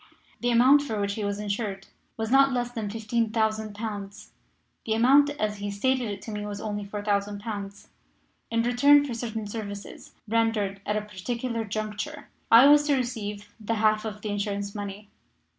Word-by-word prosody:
The 245 - 0
amount 255 +5 +6
for 225 -7 -3
which 200 0 -1
he 215 - -4
was 200 0 -1
insured 200 -1 -3 0.3
was 225 0 -3
not 275 0 +6
less 245 -1 -1
than 225 -4 -4
15,000 220 -1 -1
pounds. 205 -2 -6 0.6
The 220 - +1
amount 275 +5 +5
as 210 -1 -1
he 205 0 -3
stated 245 +4 0
it 200 -1 -6
to 220 - -7
me 210 0 -4
was 205 -1 -5
only 205 -1 -4
4,000 205 0 -2
pounds. 205 -2 -6 0.6
In 230 0 +1
return 280 +4 +5
for 265 - -4
certain 225 -2 -4
services 205 -1 -7
rendered 215 -3 0
at 210 - +1
a - - -1
particular 230 +3 -4
juncture 215 +8 -5 0.2
I 230 +4 +9
was 290 +1 +7
to 290 - +4
receive 210 -5 -4
the 225 +1 -2
half 215 0 +2
of 210 -1 -6
the 215 - -3
insurance 200 0 -2
money. 205 0 -7
215 Hz, 175 wpm, -26 LUFS, 205-235 Hz, 0.6 s, I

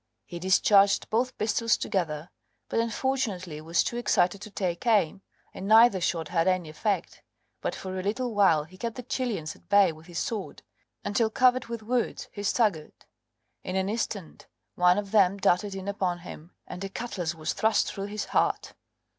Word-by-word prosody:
He 175 - -7
discharged 195 +2 +4
both 250 +3 0
pistols 225 +1 +1
together, 160 -4 -2 0.4
but - - 0
unfortunately 225 - -2
was 165 +2 +1
too 240 - -3
excited 200 -5 +1
to 215 - -8
take 185 0 -3
aim, 200 -4 +2 0.3
and 195 - -6
neither 220 -2 +6
shot 165 -2 -1
had 165 0 +1
any 185 -3 +1
effect, 200 +6 -2 0.4
but - - -2
for 190 0 -5
a - - -2
little 225 +5 -2
while 190 -7 +4
he 185 +5 -16
kept 230 0 -3
the 250 - -7
Chilians 225 - -3
at - - -24
bay 200 -3 +5
with 160 +1 -14
his 175 -1 -8
sword, 210 +2 -4 0.4
until 220 +2 +1
covered 255 +2 +3
with 230 -1 -6
wounds 240 +2 -2
he 205 - -7
staggered; 205 -6 0 0.6
in 185 - -4
an 190 +1 0
instant 205 -5 -4 0.3
one 180 +1 +4
of 205 -1 -3
them 200 -3 +4
darted 195 +1 +1
in 190 0 -6
upon 190 -3 -1
him, 165 +1 -11
and 180 - -7
a 195 - -4
cutlass 185 -7 -4
was 155 -1 -3
thrust 220 +2 +1
through 195 -1 -4
his 210 +1 -4
heart. - - +1
200 Hz, 180 wpm, -27 LUFS, 175-220 Hz, 0.6 s, neither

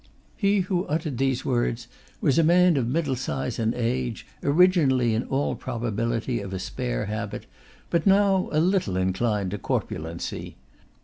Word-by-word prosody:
He 200 -1 +2
who 185 0 -1
uttered 150 -4 -2
these 135 -1 0
words 120 -1 0 0.3
was 150 +1 +3
a - - +5
man 175 +1 +5
of 130 -4 0
middle 145 0 0
size 130 -1 -3
and 115 0 0
age, 120 -1 -2 0.2
originally 145 -7 +4
in 110 - -1
all 140 +2 0
probability 115 0 -2
of 95 -1 -6
a - - -2
spare - - -3
habit, 105 0 -4 0.5
but 170 +2 +1
now 195 -1 +4
a 155 - +2
little 175 - +1
inclined 95 +1 0
to 105 - -4
corpulency. 80 -1 -4
125 Hz, 150 wpm, -25 LUFS, 110-165 Hz, 0.5 s, a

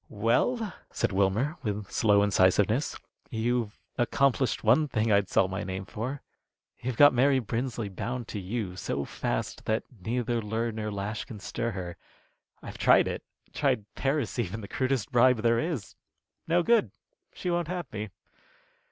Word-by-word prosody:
"Well," 125 - +1 0.2
said - - 0
Wilmer, 100 - +1
with 105 -2 -4
slow 105 -3 +4
incisiveness, 105 +6 +3 0.3
"you've 115 -1 -1 0.2
accomplished 130 +1 +2
one 125 +8 +4
thing 110 -4 0
I'd 100 -1 +3
sell 95 - +3
my 95 +1 -4
name 95 0 -4
for. 130 +8 -5 0.6
You've 125 -1 -3
got 145 -1 +8
Mary 135 +2 +4
Brinsley 120 -1 -2
bound 120 +5 -4
to 105 - -4
you 95 -1 -3
so 70 -5 -3
fast - - -3
that 110 +1 0 0.2
neither 120 +4 -1
lure 110 +2 -1
nor 110 -1 -4
lash 100 +2 -3
can 110 - -9
stir 115 +4 -3
her. 90 -3 -6 0.7
I've - - -8
tried - - +5
it - - -3 0.3
tried 105 - +1
Paris 135 -3 -1
even, 110 0 -2
the 100 - -8
crudest 130 -3 -1
bribe 120 -2 +4
there 115 0 +4
is. 145 - -3 0.5
No 170 +1 +3
good! 230 +3 +4 0.5
She 180 - -2
won't 175 -2 0
have 175 0 -3
me." 105 0 -4
115 Hz, 155 wpm, -28 LUFS, 105-130 Hz, 0.7 s, got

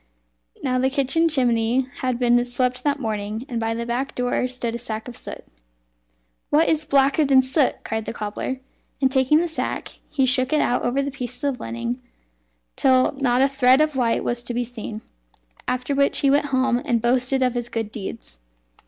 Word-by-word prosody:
Now 255 -1 +1
the 260 +1 +2
kitchen 280 +5 +2
chimney 240 -3 +2 0.2
had 255 -2 -1
been 240 0 +3
swept 250 +1 -1
that 290 -1 +1
morning, 215 -2 -4
and 240 -5 -3
by 225 0 -1
the 235 0 -3
back 245 +3 -3
door 250 0 0
stood 250 -2 -3
a 235 - -4
sack 220 -1 -4
of 245 - -8
soot. - - -7 1.1
"What 315 +3 +4
is 310 -1 +1
blacker 280 +1 +3
than 270 -2 +5
soot?" 265 +1 +2
said 220 -1 -3
the - - -3
cobbler; 225 +4 -4 0.4
and 265 -1 +2
taking 265 +2 +4
the 345 - 0
sack, 320 - -4
he 285 -3 +1
shook 255 +2 +3
it 305 - +4
out 245 - +1
over 260 +3 0
the 280 - -3
pieces 250 -1 -7
of 280 -3 -1
linen 115 +2 -4 0.7
till 255 -1 +3
not 265 -2 +1
a - - +5
thread 265 -1 +4
of 305 -1 +2
white 240 -3 +1
was 240 0 -1
to 240 0 -5
be 245 - 0
seen. 225 -2 -7 0.6
After 250 +2 -1
which 280 0 +2
he 275 - +4
went 290 +1 +2
home, 260 -2 +1
and 245 -6 +1
boasted 255 +3 +2
of 250 -1 +1
his 240 -1 -3
good 225 -2 -3
deeds. 115 - -8
255 Hz, 195 wpm, -23 LUFS, 235-275 Hz, 1.1 s, than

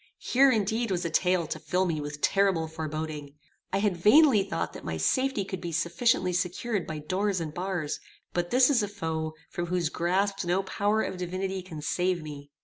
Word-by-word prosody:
Here, 270 +2 +4
indeed, 225 0 +1
was 180 -2 -1
a 165 - -2
tale 180 +1 +2
to 155 - -5
fill 180 +5 0
me 160 -4 -1
with 145 0 -6
terrible 195 -5 +2
foreboding. 155 -2 -5 0.4
I - - +1
had 200 -2 +1
vainly 215 - +6
thought 195 -4 -3
that - - -9
my 80 -1 -3
safety 260 - +1
could 190 -1 -5
be 170 -2 -4
sufficiently 175 +3 +1
secured 180 +3 -1
by 155 - -4
doors 185 +5 -1
and 155 -2 -4
bars, 175 -4 -3 0.3
but 175 0 -1
this 255 +2 +5
is 245 -5 +3
a 205 - -1
foe 160 -5 -3 0.2
from 175 0 -3
whose 175 -2 0
grasp 195 +4 0
no 180 +2 +1
power 205 +3 0
of - - -4
divinity 185 +2 -3
can 165 -5 -9
save 180 +1 0
me! 145 -2 -9
180 Hz, 195 wpm, -28 LUFS, 160-200 Hz, 0.4 s, vainly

